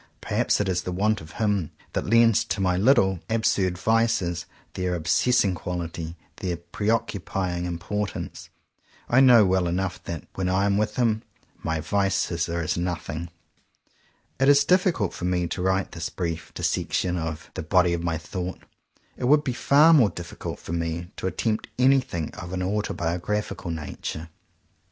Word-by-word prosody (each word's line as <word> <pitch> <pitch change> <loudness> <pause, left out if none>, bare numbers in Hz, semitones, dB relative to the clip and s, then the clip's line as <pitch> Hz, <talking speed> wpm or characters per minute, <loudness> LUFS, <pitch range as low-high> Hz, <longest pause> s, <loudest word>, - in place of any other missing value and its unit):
Perhaps - - +1
it 105 - 0
is 90 -2 0
the 90 - -4
want 105 +3 +1
of 80 0 -12
him 105 -7 0 0.2
that - - -2
lends 115 0 +5
to - - -2
my 90 -2 +2
little 95 -3 +4
absurd 100 -5 +1
vices 95 -6 +1 0.3
their 90 -1 -1
obsessing 95 +5 +2
quality, 85 -1 -5 0.2
their 90 -3 -2
preoccupying 95 -2 -2
importance. 90 +4 -4 0.6
I 125 - +4
know 120 -5 +8
well 95 -1 +2
enough 90 +1 -2
that, 85 -1 -5
when 95 -1 -1
I 95 +2 +2
am 100 0 +2
with 105 0 -1
him, 115 -3 +1 0.4
my 80 -1 -1
vices 95 -1 0
are 85 0 -1
as 80 - -1
nothing. 85 -1 -3 1.1
If 135 - +3
it - - +7
is 145 0 +6
difficult 180 - +2
for 90 - -5
me 90 -1 +1
to 90 - -4
write 95 +1 +1
this 85 0 -4
brief 85 -3 -4
dissection 90 -1 0
of 80 -2 -4
"the - - -4
body 90 +1 +3
of 85 - -1
my 85 -1 -1
thought," 90 +3 -5 0.6
it 125 - -3
would 150 +3 +5
be 130 - -1
far 150 +6 +5
more 125 -10 +6
difficult 85 -1 -7
for 85 - -7
me 85 +1 -3
to - - -2
attempt 110 +3 -1
anything 125 - +2
of 90 0 -8
an 95 0 -1
autobiographical 95 -1 -2
nature. 80 0 -5
95 Hz, 160 wpm, -25 LUFS, 85-105 Hz, 1.1 s, know